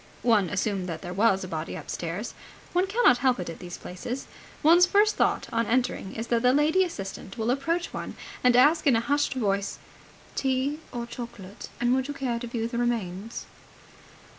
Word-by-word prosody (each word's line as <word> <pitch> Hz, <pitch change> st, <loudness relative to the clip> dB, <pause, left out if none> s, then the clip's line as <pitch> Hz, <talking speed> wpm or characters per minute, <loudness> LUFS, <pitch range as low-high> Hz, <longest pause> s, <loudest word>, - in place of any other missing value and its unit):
One 215 Hz, -7 st, +3 dB
assumed 195 Hz, -2 st, -1 dB
that 165 Hz, -, -5 dB
there 175 Hz, 0 st, -5 dB
was 195 Hz, -1 st, +3 dB
a -, -, -5 dB
body 160 Hz, -2 st, -4 dB
upstairs. 175 Hz, +6 st, -5 dB, 0.4 s
One 360 Hz, +2 st, +2 dB
cannot 410 Hz, -, +4 dB
help 255 Hz, -4 st, +2 dB
it 175 Hz, -2 st, -4 dB
at -, -, -10 dB
these 175 Hz, -1 st, -7 dB
places. 235 Hz, +9 st, -6 dB, 0.4 s
One's 345 Hz, +4 st, +7 dB
first 415 Hz, +3 st, +4 dB
thought -, -, +1 dB
on 230 Hz, -1 st, +1 dB
entering 240 Hz, -5 st, 0 dB
is 225 Hz, -, -3 dB
that 230 Hz, -, +3 dB
the 250 Hz, +1 st, +4 dB
lady 310 Hz, +6 st, +4 dB
assistant 195 Hz, -, -6 dB
will 225 Hz, +1 st, 0 dB
approach 330 Hz, +6 st, -1 dB
one -, -, -5 dB, 0.3 s
and 250 Hz, -1 st, +5 dB
ask 300 Hz, +5 st, +5 dB
in 265 Hz, -, +6 dB
a -, -, +4 dB
hushed 285 Hz, +4 st, 0 dB
voice 200 Hz, -5 st, 0 dB, 0.6 s
"Tea 270 Hz, +3 st, 0 dB
or 240 Hz, -1 st, -4 dB
chocolate? 235 Hz, -5 st, -8 dB
And 240 Hz, +1 st, +2 dB
would 260 Hz, 0 st, +1 dB
you 290 Hz, -, -5 dB
care 245 Hz, -4 st, -2 dB
to 240 Hz, -, -5 dB
view 230 Hz, -1 st, -2 dB
the 235 Hz, 0 st, -3 dB
remains?" 225 Hz, -3 st, -2 dB
240 Hz, 190 wpm, -27 LUFS, 200-275 Hz, 0.6 s, One's